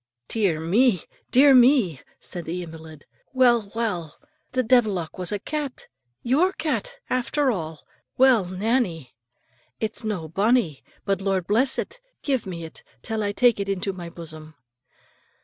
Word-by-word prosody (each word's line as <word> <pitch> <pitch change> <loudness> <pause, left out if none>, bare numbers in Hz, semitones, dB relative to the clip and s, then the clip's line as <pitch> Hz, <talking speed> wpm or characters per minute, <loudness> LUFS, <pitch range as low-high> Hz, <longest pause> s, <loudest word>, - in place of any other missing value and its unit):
"Dear 195 -8 +1
me! 190 +4 +2 0.3
dear 275 +2 +6
me!" 245 - +5 0.2
said 175 -2 -8
the 180 +2 -4
invalid. 160 -2 -11 0.3
"Well, 240 -5 +3
well; 180 -10 -2
and - - -31 0.2
the 255 0 +1
deevilock 215 -9 +1
was 180 +1 -2
a 205 - 0
cat 290 +4 -5 0.4
your 315 +10 +2
cat - - -3
after 260 +2 +1
all. 160 -6 -5 0.3
Well, 255 -6 +5
Nannie, 185 - -1 0.7
it's 220 0 -2
no 200 -7 -3
bonnie; 195 - +1 0.2
but, 195 -2 0
Lord 190 -2 0
bless 235 +8 +2
it, 485 +1 -5 0.2
give 265 -8 0
me 170 -3 -6
it, 160 - -10 0.2
till 220 -2 -2
I 205 -1 0
take 240 +1 +3
it 200 0 -2
into 195 0 -1
my 175 -2 -7
bosom." 155 -2 -8
205 Hz, 150 wpm, -24 LUFS, 170-250 Hz, 0.7 s, dear